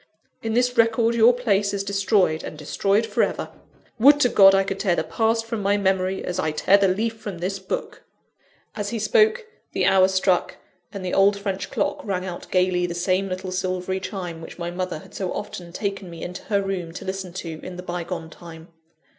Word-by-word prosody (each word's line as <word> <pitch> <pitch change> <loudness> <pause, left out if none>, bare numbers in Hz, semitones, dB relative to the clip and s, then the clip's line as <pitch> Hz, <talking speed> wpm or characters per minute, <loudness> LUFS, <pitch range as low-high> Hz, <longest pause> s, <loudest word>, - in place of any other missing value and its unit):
In 225 0 -2
this 245 0 +2
record 230 0 +3
your 235 +1 +6
place 205 -5 +1
is 195 - -2
destroyed 195 -4 +1
and - - -7
destroyed 195 +8 +1
for - - 0
ever. - - -1 0.5
Would 285 +5 +7
to 245 - +5
God 195 -3 +7
I 195 - +3
could 195 0 -4
tear 190 -4 +2
the - - 0
past 225 0 0
from 225 -2 -3
my 200 +1 +2
memory, 190 -1 0
as 180 0 -3
I 160 - +1
tear 185 +6 +4
the 200 - +4
leaf 220 +4 -1
from 205 -5 -6
this 190 +3 -3
book!" 190 - -5 0.7
As 205 -2 -3
he 230 - -3
spoke, 435 - +3 0.3
the - - +1
hour 190 -1 +5
struck; 190 -1 +1 0.3
and 200 -2 -6
the 180 - -3
old 200 +1 +4
French 200 -1 -4
clock - - -2
rang 185 -3 -2
out 180 -2 -7
gaily 180 -1 +2
the 170 - -5
same 185 +2 0
little 185 0 -4
silvery 185 0 -2
chime 180 -4 -6
which 160 - -10
my 175 -1 -4
mother 180 -1 -3
had - - -14
so 185 -2 -3
often 175 -1 -6
taken 195 0 -4
me 170 -1 -8
into 180 +1 -7
her 200 -2 +1
room 180 -4 -4
to - - -8
listen 190 -1 -4
to, 165 -4 -6
in 185 - -8
the 180 - -7
bygone 170 -2 -5
time. 165 -1 -12
195 Hz, 210 wpm, -23 LUFS, 180-205 Hz, 0.7 s, Would